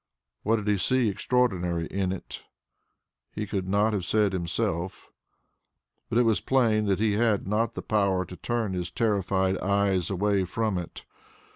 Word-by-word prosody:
What 110 +2 +2
did 105 -2 -4
he 105 -1 +3
see 125 +3 +2
extraordinary 95 -7 0
in 95 +1 -2
it? 95 - -7 0.9
He 105 - -2
could 95 -2 -3
not 105 +3 +2
have 100 -3 -1
said 105 +2 +1
himself, 85 0 -3 1.0
but 115 - 0
it 120 - +5
was 110 -7 +2
plain 115 -5 +2
that 100 -2 +1
he 110 0 +1
had 105 -1 +1
not 110 +3 0
the - - -5
power 100 -3 +1
to 90 - -10
turn 115 -1 -2
his 90 -1 -3
terrified 95 -3 0
eyes 100 -2 +1
away 100 0 +1
from 105 0 -1
it. 85 - -9
100 Hz, 160 wpm, -27 LUFS, 95-110 Hz, 1.0 s, it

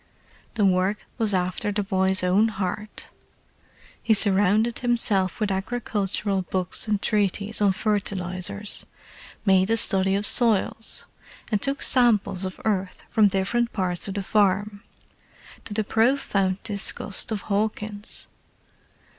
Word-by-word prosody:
The 210 -3 +2
work 190 +2 +1
was 220 -2 +2
after 180 +3 -1
the 205 0 -1
boy's 190 -1 +1
own 190 +5 +3
heart: 210 0 -5 0.9
he 225 -1 +3
surrounded 205 +3 +2
himself 215 -7 +2
with 210 -2 0
agricultural 200 -1 -2
books 185 +3 -1
and 210 -2 +1
treaties 210 0 -1
on 200 -1 +4
fertilizers, 200 -1 -2 0.6
made 190 0 +4
a 225 - +2
study 195 -3 +2
of 200 +1 +2
soils, 225 -1 0 0.5
and 210 -2 +1
took 275 0 -2
samples 215 -7 +3
of 185 - -6
earth 195 -4 -2
from 215 -2 +5
different 205 +5 0
parts 180 -2 -1
of 195 - -5
the 200 - -2
farm—to 205 +2 -3
the 215 +1 0
profound 210 -5 +1
disgust 205 -1 0
of 210 -3 -2
Hawkins. 210 +1 -2
205 Hz, 120 wpm, -24 LUFS, 190-215 Hz, 0.9 s, from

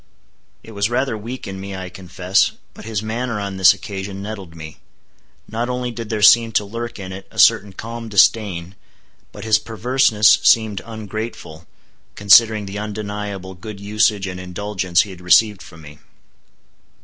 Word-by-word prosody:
It 115 - -12
was 100 0 -1
rather 125 0 -1
weak 115 +5 -7
in 95 0 -7
me 100 0 -7
I 95 -1 -6
confess, 90 +1 0 0.2
but - - -12
his 110 -2 -3
manner 115 0 -3
on 100 -1 -5
this 95 -1 +7
occasion 95 0 -6
nettled 100 -5 -8
me. 80 -1 -10 0.7
Not 115 +3 -3
only 125 0 -3
did 115 -2 -7
there 110 -2 -2
seem 115 +1 +6
to 105 - +1
lurk 115 +3 -6
in 95 -2 -8
it 95 +1 -9
a - - -18
certain 100 0 +4
calm 115 +3 -8
disdain, 100 -4 +2 0.6
but - - -10
his 110 -1 +3
perverseness 115 -1 +3
seemed 110 -4 +3
ungrateful, 110 -7 -7 0.5
considering 105 +1 +5
the 100 +1 -6
undeniable 105 -2 -5
good 100 +3 -10
usage 105 0 +1
and 90 -1 -6
indulgence 90 -1 -1
he 105 - -5
had 90 -1 -12
received 100 +3 +4
from 85 -2 -14
me. 75 0 -13
105 Hz, 160 wpm, -19 LUFS, 95-110 Hz, 0.7 s, this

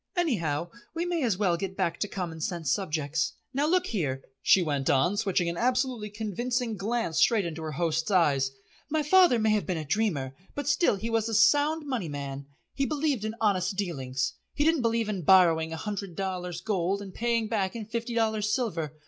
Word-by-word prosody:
Anyhow 175 - 0 0.2
we 335 +1 -1
may 350 -2 -1
as 225 -8 +1
well 185 -4 +2
get 190 +1 -5
back 170 0 -1
to 205 - 0
common 170 -5 -5
sense 165 -4 -2
subjects. 155 -5 -1 0.2
Now 285 +3 +1
look 365 +2 +2
here," 140 - -2 0.2
she 190 - +5
went 145 -4 -1
on, 175 +9 +3
switching 190 -3 +1
an 170 0 -2
absolutely 250 -2 0
convincing 225 +3 -2
glance 210 -4 -1
straight 220 -5 +4
into 165 -1 -5
her 155 -1 -4
host's 160 +3 0
eyes, 145 -8 +3 0.4
"my 310 0 +1
father 355 -3 +5
may 220 -1 +2
have 210 -1 +1
been 180 -3 -1
a 155 - -4
dreamer, 145 -8 -1 0.2
but 285 -1 -4
still 295 - +3
he 220 +4 -4
was 225 0 +1
a 225 - -1
Sound 295 +8 +4
Money 245 - -2
man. 140 -1 -6 0.3
He 275 -1 0
believed 290 -6 0
in 220 +1 -3
honest 200 -3 +1
dealings. 135 -9 -2 0.2
He 290 - +2
didn't 320 -2 +3
believe 230 -1 +1
in 200 -4 -2
borrowing 165 -2 +5
a 160 - -4
hundred 200 -1 -5
dollars 180 -2 -3
gold 195 -1 -1
and 190 -2 -10
paying 230 -1 0
back 200 -3 -1
in 225 -2 -5
fifty 235 +2 -4
dollars 220 -2 +1
silver. 165 - -2
200 Hz, 200 wpm, -28 LUFS, 165-235 Hz, 0.4 s, she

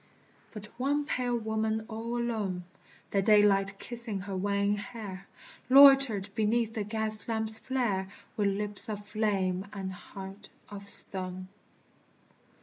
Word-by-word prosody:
But 210 -1 -9
one 285 +3 0
pale 250 -4 -1
woman 220 0 -2
all 230 +2 -5
alone, 215 -7 -3 0.5
The 200 - +1
daylight 200 -1 +3
kissing 230 -4 -3
her 195 0 -6
wan 200 +1 0
hair, 200 -4 -8 0.4
Loitered 270 -7 +6
beneath 225 +1 0
the 215 - -3
gas 215 0 +1
lamps' 220 -1 +4
flare, 220 -8 -2 0.3
With 205 -2 0
lips 205 +2 +4
of 205 -1 -6
flame 200 -3 -1
and 190 -2 -6
heart 195 +2 -11 0.2
of 200 -1 -10
stone. 185 -1 -5
210 Hz, 125 wpm, -29 LUFS, 195-225 Hz, 0.5 s, Loitered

